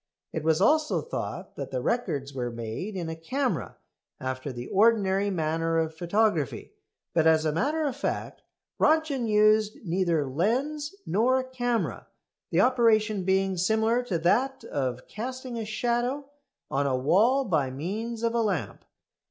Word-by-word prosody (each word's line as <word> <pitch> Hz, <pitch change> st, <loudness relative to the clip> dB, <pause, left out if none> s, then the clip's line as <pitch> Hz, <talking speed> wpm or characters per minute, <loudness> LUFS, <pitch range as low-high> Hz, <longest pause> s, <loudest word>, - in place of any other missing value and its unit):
It 160 Hz, -, -3 dB
was 160 Hz, 0 st, +3 dB
also 305 Hz, +8 st, +3 dB
thought -, -, -5 dB
that -, -, -5 dB
the -, -, -2 dB
records 155 Hz, -, -1 dB
were 125 Hz, -2 st, -2 dB
made 115 Hz, -, -5 dB
in 175 Hz, -3 st, -3 dB
a 160 Hz, -, -4 dB
camera 255 Hz, +11 st, -2 dB, 0.4 s
after 130 Hz, +1 st, -4 dB
the 120 Hz, -1 st, -6 dB
ordinary 200 Hz, -, +3 dB
manner 165 Hz, -2 st, 0 dB
of 160 Hz, -1 st, 0 dB
photography, 175 Hz, -, 0 dB, 0.4 s
but 160 Hz, -1 st, +3 dB
as 160 Hz, -1 st, +4 dB
a 155 Hz, -, +2 dB
matter 290 Hz, -, 0 dB
of 280 Hz, -4 st, -1 dB
fact 280 Hz, -, -3 dB, 0.4 s
Röntgen 305 Hz, -6 st, +2 dB
used 215 Hz, 0 st, +4 dB
neither 170 Hz, -4 st, +1 dB
lens 260 Hz, -, -1 dB
nor 255 Hz, +7 st, +2 dB
camera, 245 Hz, -2 st, -2 dB, 0.4 s
the -, -, +3 dB
operation 220 Hz, -5 st, +3 dB
being 190 Hz, 0 st, +1 dB
similar 220 Hz, +6 st, +2 dB
to 190 Hz, -8 st, -1 dB
that 245 Hz, +11 st, +1 dB
of 130 Hz, -3 st, -3 dB
casting 255 Hz, +1 st, -5 dB
a 220 Hz, -, -3 dB
shadow 240 Hz, +5 st, -1 dB, 0.4 s
on 140 Hz, +1 st, +1 dB
a 130 Hz, -2 st, +1 dB
wall 225 Hz, -, +3 dB
by 155 Hz, -, +1 dB
means 215 Hz, -, -4 dB
of 230 Hz, 0 st, +1 dB
a 235 Hz, -, +2 dB
lamp. 180 Hz, -, -2 dB
205 Hz, 150 wpm, -27 LUFS, 160-245 Hz, 0.4 s, as